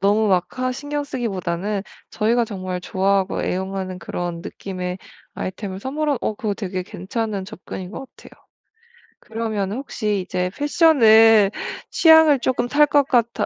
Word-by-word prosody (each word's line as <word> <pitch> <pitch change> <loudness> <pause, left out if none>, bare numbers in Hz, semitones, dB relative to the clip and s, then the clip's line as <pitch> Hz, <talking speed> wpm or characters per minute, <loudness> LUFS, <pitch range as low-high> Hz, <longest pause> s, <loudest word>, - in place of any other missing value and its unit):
너무 210 +2 +3
막 180 -2 +3
하 255 0 0
신경 290 +2 -4
쓰기보다는 200 -6 -3 0.3
저희가 230 +3 +1
정말 185 -4 -5
좋아하고 190 +1 0
애용하는 190 0 -3
그런 175 -2 -5
느낌의 180 -1 -5 0.4
아이템을 190 0 -5
선물하 290 +4 -1
어 220 - -1
그거 210 -1 -2
되게 185 -3 -4
괜찮은 200 +2 -4
접근인 190 -2 -8
것 270 +6 -7
같아요. - - -15 0.9
그러면은 220 -2 -3
혹시 215 -6 -2
이제 180 0 -2
패션을 225 - +5 0.4
취향을 320 -4 +6
쪼끔 245 -1 0
탈 295 +4 +4
것 285 -1 +3
같아 235 -3 +1
210 Hz, 315 characters per minute, -21 LUFS, 190-255 Hz, 0.9 s, 취향을